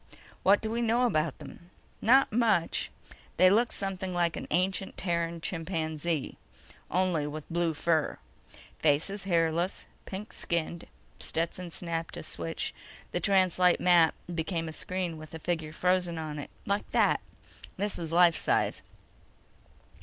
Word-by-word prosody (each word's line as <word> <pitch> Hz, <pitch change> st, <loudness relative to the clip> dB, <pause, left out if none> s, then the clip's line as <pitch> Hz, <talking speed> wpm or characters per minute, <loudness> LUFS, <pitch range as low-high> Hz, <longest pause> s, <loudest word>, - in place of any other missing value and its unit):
"What 200 Hz, +2 st, +5 dB
do 220 Hz, -, -3 dB
we 235 Hz, +1 st, 0 dB
know 235 Hz, +2 st, +2 dB
about 155 Hz, -, +1 dB
them?" 175 Hz, -, -12 dB, 0.3 s
"Not 260 Hz, +1 st, +5 dB
much. 215 Hz, -8 st, +2 dB, 0.5 s
They 185 Hz, +1 st, +7 dB
look 230 Hz, +3 st, +3 dB
something 190 Hz, -2 st, -3 dB
like 170 Hz, -1 st, +1 dB
an -, -, -6 dB
ancient 190 Hz, +3 st, 0 dB
Terran 170 Hz, -2 st, -1 dB
chimpanzee... 160 Hz, -3 st, -2 dB, 0.5 s
only 175 Hz, -4 st, +1 dB
with 150 Hz, 0 st, -6 dB
blue 170 Hz, -2 st, +1 dB
fur. 160 Hz, 0 st, +1 dB, 0.6 s
Face 150 Hz, +4 st, +3 dB
is 200 Hz, -1 st, -4 dB
hairless, 170 Hz, 0 st, +1 dB, 0.2 s
pink 200 Hz, +3 st, -7 dB
skinned." 170 Hz, 0 st, -2 dB, 0.3 s
Stetson 170 Hz, +2 st, -2 dB
snapped 165 Hz, -1 st, -4 dB
a -, -, -6 dB
switch. -, -, -3 dB, 0.4 s
The -, -, -1 dB
translite 185 Hz, -2 st, +4 dB
map 175 Hz, -3 st, +5 dB, 0.2 s
became 165 Hz, 0 st, -2 dB
a 160 Hz, -, -6 dB
screen 180 Hz, -2 st, -3 dB
with 155 Hz, +1 st, -10 dB
a -, -, -3 dB
figure 160 Hz, -2 st, -2 dB
frozen 180 Hz, 0 st, +1 dB
on 155 Hz, -2 st, -4 dB
it. 145 Hz, -, -7 dB, 0.2 s
"Like 200 Hz, +1 st, -1 dB
that. -, -, +3 dB, 0.6 s
This 205 Hz, +1 st, -1 dB
is 165 Hz, -2 st, -4 dB
life 170 Hz, 0 st, +6 dB
size." -, -, +1 dB
175 Hz, 140 wpm, -29 LUFS, 160-190 Hz, 0.6 s, They